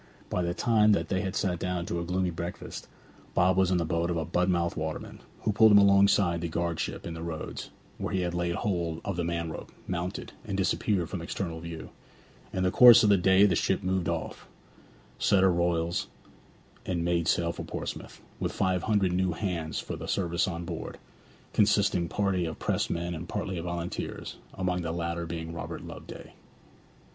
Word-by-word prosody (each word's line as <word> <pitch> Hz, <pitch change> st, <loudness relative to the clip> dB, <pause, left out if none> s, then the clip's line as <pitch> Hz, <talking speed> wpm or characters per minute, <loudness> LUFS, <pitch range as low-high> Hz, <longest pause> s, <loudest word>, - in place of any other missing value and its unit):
By 90 Hz, -, 0 dB
the 85 Hz, 0 st, -1 dB
time 110 Hz, -1 st, +4 dB
that -, -, 0 dB
they 95 Hz, -1 st, +1 dB
had 95 Hz, -2 st, -3 dB
sat 90 Hz, -3 st, 0 dB
down 90 Hz, -1 st, -2 dB
to 85 Hz, -, -2 dB
a -, -, -2 dB
gloomy 90 Hz, +1 st, 0 dB
breakfast, 85 Hz, +1 st, -6 dB, 0.5 s
Bob 90 Hz, 0 st, +4 dB
was 95 Hz, -1 st, +3 dB
in 90 Hz, -, +2 dB
the 85 Hz, -, 0 dB
boat 85 Hz, +1 st, 0 dB
of 85 Hz, -, 0 dB
a 80 Hz, -, -1 dB
Budmouth 85 Hz, 0 st, +1 dB
waterman, 80 Hz, 0 st, -5 dB, 0.2 s
who 105 Hz, -, +1 dB
pulled 110 Hz, +1 st, +6 dB
him 105 Hz, -, +8 dB
alongside 100 Hz, -3 st, +5 dB
the 85 Hz, -, -1 dB
guardship 85 Hz, 0 st, -2 dB
in 85 Hz, -, -4 dB
the 80 Hz, -, -7 dB
roads, 80 Hz, -2 st, -5 dB, 0.3 s
where -, -, -3 dB
he 90 Hz, -2 st, 0 dB
laid 85 Hz, 0 st, -1 dB
hold 85 Hz, -5 st, -2 dB
of 100 Hz, -, -2 dB
the 85 Hz, -, -1 dB
man 85 Hz, -1 st, -2 dB
rope, -, -, -8 dB, 0.2 s
mounted, 90 Hz, +1 st, -3 dB
and 100 Hz, -4 st, -3 dB
disappeared 95 Hz, -1 st, +1 dB
from 95 Hz, -1 st, -5 dB
external 85 Hz, -1 st, -4 dB
view. 85 Hz, -1 st, -8 dB, 0.6 s
In 95 Hz, -, -1 dB
the 90 Hz, -, +2 dB
course 120 Hz, +1 st, +9 dB
of 105 Hz, -, +5 dB
the 100 Hz, -, +6 dB
day 95 Hz, +2 st, +5 dB
the 95 Hz, -4 st, +3 dB
ship 95 Hz, +3 st, +1 dB
moved 95 Hz, -2 st, 0 dB
off, -, -, -4 dB, 0.7 s
set 95 Hz, -1 st, +4 dB
her 95 Hz, -2 st, +5 dB
royals, 85 Hz, +2 st, 0 dB, 0.8 s
and 85 Hz, -2 st, -2 dB
made 85 Hz, -1 st, +1 dB
sail 85 Hz, 0 st, +2 dB
for -, -, -7 dB
Portsmouth, -, -, -6 dB, 0.2 s
with -, -, -1 dB
five 95 Hz, -1 st, 0 dB
hundred 100 Hz, -3 st, +1 dB
new 90 Hz, -1 st, +1 dB
hands 85 Hz, -4 st, -3 dB
for -, -, -5 dB
the -, -, -7 dB
service 85 Hz, -3 st, 0 dB
on 85 Hz, -2 st, -4 dB
board, -, -, -6 dB, 0.6 s
consisting 100 Hz, -5 st, +3 dB
partly 95 Hz, -3 st, 0 dB
of 80 Hz, -, -5 dB
pressed -, -, -1 dB
men 85 Hz, +1 st, -2 dB
and 85 Hz, +2 st, -7 dB
partly 95 Hz, -2 st, -3 dB
of 85 Hz, -, -6 dB
volunteers, 85 Hz, 0 st, -4 dB, 0.2 s
among 90 Hz, -1 st, -1 dB
the 85 Hz, -1 st, -2 dB
latter 85 Hz, 0 st, -3 dB
being 80 Hz, 0 st, -5 dB
Robert 85 Hz, -, -6 dB
Loveday. -, -, -10 dB
90 Hz, 190 wpm, -28 LUFS, 85-95 Hz, 0.8 s, course